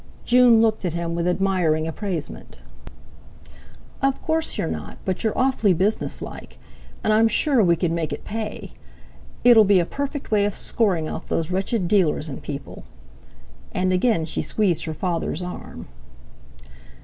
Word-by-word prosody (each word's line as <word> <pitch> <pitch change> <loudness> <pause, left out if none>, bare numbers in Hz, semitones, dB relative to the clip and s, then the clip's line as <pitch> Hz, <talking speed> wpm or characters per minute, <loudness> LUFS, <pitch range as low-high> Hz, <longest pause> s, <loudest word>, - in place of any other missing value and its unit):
June 240 -2 +6
looked 220 -2 +1
at 170 -3 -2
him 170 -1 -2
with 170 +1 -1
admiring 180 -4 +1
appraisement. 160 - -6 1.4
"Of 275 0 +1
course 320 0 -1
you're - - -1
not, 80 -1 -6
but 190 +2 -2
you're 220 - -1
awfully 255 -7 +3
businesslike. 195 +6 -3 0.5
And 215 - +2
I'm 225 +1 +5
sure 260 +3 +2
we 170 -2 +4
could 170 0 -1
make 165 -2 -2
it - - -6
pay. 220 0 -5 0.7
It'll 240 -3 +8
be 200 -2 +4
a 170 - +1
perfect 280 - -5
way 205 -1 +3
of 205 - -2
scoring 185 -9 0
off - - -6
those 165 +1 -1
wretched 190 +1 -1
dealers 170 -5 +2
and 135 - -7
people." 140 -2 -7 0.9
And 185 0 +1
again 180 -3 +2
she 160 - -2
squeezed 195 -6 0
her 160 -1 -4
father's 175 0 -2
arm. 180 - -8
185 Hz, 150 wpm, -23 LUFS, 165-220 Hz, 1.4 s, It'll